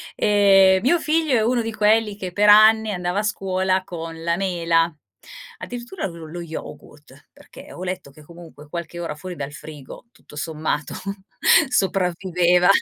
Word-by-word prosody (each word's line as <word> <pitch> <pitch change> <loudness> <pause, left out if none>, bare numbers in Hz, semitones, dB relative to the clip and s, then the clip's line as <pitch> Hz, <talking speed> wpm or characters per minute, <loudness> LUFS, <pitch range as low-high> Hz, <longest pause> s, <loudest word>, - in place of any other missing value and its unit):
Ehm, 195 -2 +4
mio 335 +7 +3
figlio 310 -2 +1
è 225 - +3
uno 240 +1 +1
di 225 0 -4
quelli 215 0 +2
che 185 -3 -6
per 205 +3 +3
anni 215 +1 +6
andava 180 0 -2
a - - -1
scuola 190 -2 -1
con 165 -2 -8
la 170 +1 0
mela 170 -3 0 0.7
addirittura 245 +9 -6
lo 170 -2 -10
lo 170 +3 -8
yogurt 150 -3 -11
perché - - -15
ho - - -10
letto 185 -6 -5
che, 155 - -17
comunque, 165 -2 -14
qualche 170 +1 -7
ora 165 -3 -4
fuori 180 +3 -8
dal 145 -2 -6
frigo 150 - -11
tutto 150 - -18
sommato 150 -1 -3 0.8
sopravviveva! 180 -4 +1
180 Hz, 155 wpm, -22 LUFS, 165-210 Hz, 0.8 s, anni